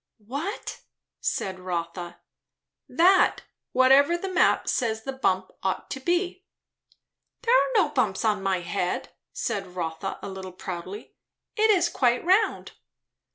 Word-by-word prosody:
"What?" 295 Hz, -, -5 dB, 0.4 s
said 190 Hz, -1 st, -2 dB
Rotha. 175 Hz, -1 st, -4 dB, 0.7 s
"That; 370 Hz, +3 st, +4 dB, 0.3 s
whatever 270 Hz, +6 st, +5 dB
the 375 Hz, +1 st, -5 dB
map 365 Hz, -, +3 dB
says 220 Hz, -3 st, 0 dB
the 270 Hz, -, -4 dB
bump 190 Hz, -8 st, 0 dB
ought 190 Hz, -1 st, -2 dB
to 265 Hz, -, -3 dB
be." 355 Hz, +5 st, -1 dB, 1.0 s
"There 485 Hz, 0 st, +4 dB
are -, -, +3 dB
no 375 Hz, -8 st, +4 dB
bumps 235 Hz, -8 st, 0 dB
on 210 Hz, -2 st, +2 dB
my 190 Hz, -2 st, 0 dB
head," 180 Hz, 0 st, -2 dB, 0.2 s
said 195 Hz, -3 st, -4 dB
Rotha 165 Hz, +2 st, -3 dB
a -, -, -4 dB
little 190 Hz, -1 st, -7 dB
proudly; 185 Hz, +3 st, -7 dB, 0.4 s
"it 440 Hz, -1 st, +3 dB
is 360 Hz, -5 st, +4 dB
quite 250 Hz, -5 st, +1 dB
round." 390 Hz, +4 st, +2 dB
230 Hz, 130 wpm, -26 LUFS, -, 1.0 s, whatever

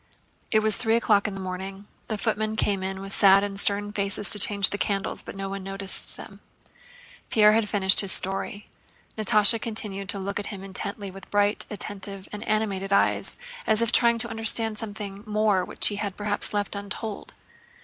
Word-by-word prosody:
It 215 Hz, -, +3 dB
was 215 Hz, -1 st, +3 dB
three 225 Hz, -1 st, +1 dB
o'clock 215 Hz, -3 st, +2 dB
in 205 Hz, -, -5 dB
the -, -, -7 dB
morning. 190 Hz, +1 st, -7 dB, 0.2 s
The 215 Hz, -, -3 dB
footmen 215 Hz, 0 st, -2 dB
came 200 Hz, -3 st, 0 dB
in 190 Hz, 0 st, -5 dB
with 195 Hz, 0 st, -2 dB
sad 195 Hz, 0 st, +6 dB
and 200 Hz, -1 st, -2 dB
stern 205 Hz, +1 st, +1 dB
faces 200 Hz, 0 st, +3 dB
to 210 Hz, -, +3 dB
change 200 Hz, 0 st, +4 dB
the 200 Hz, -, -4 dB
candles, 195 Hz, -1 st, -2 dB
but -, -, -10 dB
no 195 Hz, 0 st, -5 dB
one 195 Hz, 0 st, -6 dB
noticed 195 Hz, 0 st, +1 dB
them. -, -, -12 dB, 0.9 s
Pierre 215 Hz, 0 st, +4 dB
finished 200 Hz, -3 st, +2 dB
his 195 Hz, -2 st, +3 dB
story. 195 Hz, +2 st, -2 dB, 0.5 s
Natásha 215 Hz, 0 st, +5 dB
continued 205 Hz, -3 st, -5 dB
to 200 Hz, -, -2 dB
look 200 Hz, +1 st, -4 dB
at 205 Hz, -, -6 dB
him 195 Hz, -3 st, -8 dB
intently 200 Hz, +1 st, -5 dB
with 195 Hz, 0 st, -13 dB
bright, 205 Hz, +1 st, 0 dB
attentive, 195 Hz, -1 st, -4 dB
and 210 Hz, +1 st, -5 dB
animated 200 Hz, -3 st, -1 dB
eyes, 200 Hz, -, +1 dB, 0.3 s
as 215 Hz, -, +3 dB
if 230 Hz, -, +2 dB
trying 235 Hz, -1 st, +4 dB
to 235 Hz, +1 st, -2 dB
understand 225 Hz, -1 st, -1 dB
something 205 Hz, -2 st, -7 dB
more 210 Hz, -3 st, +1 dB
which -, -, -1 dB
he 205 Hz, -, -5 dB
had 200 Hz, -2 st, -4 dB
perhaps 205 Hz, 0 st, +1 dB
left 205 Hz, -1 st, -3 dB
untold. 200 Hz, +1 st, -6 dB
205 Hz, 185 wpm, -25 LUFS, 195-215 Hz, 0.9 s, sad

